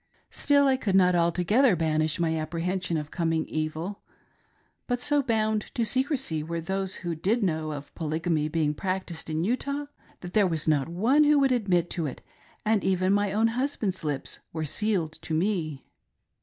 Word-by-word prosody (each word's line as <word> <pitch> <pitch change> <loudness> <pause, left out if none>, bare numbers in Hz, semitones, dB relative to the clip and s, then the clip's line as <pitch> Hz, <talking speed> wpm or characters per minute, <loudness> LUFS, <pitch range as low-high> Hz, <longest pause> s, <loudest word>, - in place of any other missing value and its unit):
Still 285 -1 +3
I 265 -1 +3
could 200 -7 -1
not 180 -1 +5
altogether 180 +8 +3
banish 155 -1 0
my 165 -1 +1
apprehension 170 +3 -2
of 150 0 -5
coming 165 -2 0
evil; 155 +5 -4 0.9
but 245 -1 0
so 290 +3 +3
bound 220 -4 0
to 235 - +1
secresy 260 - 0
were 165 +2 -4
those 190 +3 -1
who 170 - -1
did 205 +9 0
know 160 -4 -1
of 145 -1 -8
Polygamy 160 -1 -1
being 155 -1 0
practiced 185 -1 -4
in 160 +1 -1
Utah, 280 +7 -1 0.4
that 180 0 -8
there 210 -3 +4
was 160 -3 -2
not 150 -1 +2
one 240 - +3
who 295 0 +5
would 275 -2 +3
admit 180 -8 +1
it, 150 -6 -3 0.4
and 215 -2 +2
even 185 0 +2
my 205 -1 +1
own 220 +3 +2
husband's 225 -7 -2
lips 145 -3 -3
were 160 -1 -3
sealed 175 -2 -1
to 160 - -3
me. 160 -6 -1
180 Hz, 170 wpm, -27 LUFS, 160-220 Hz, 0.9 s, not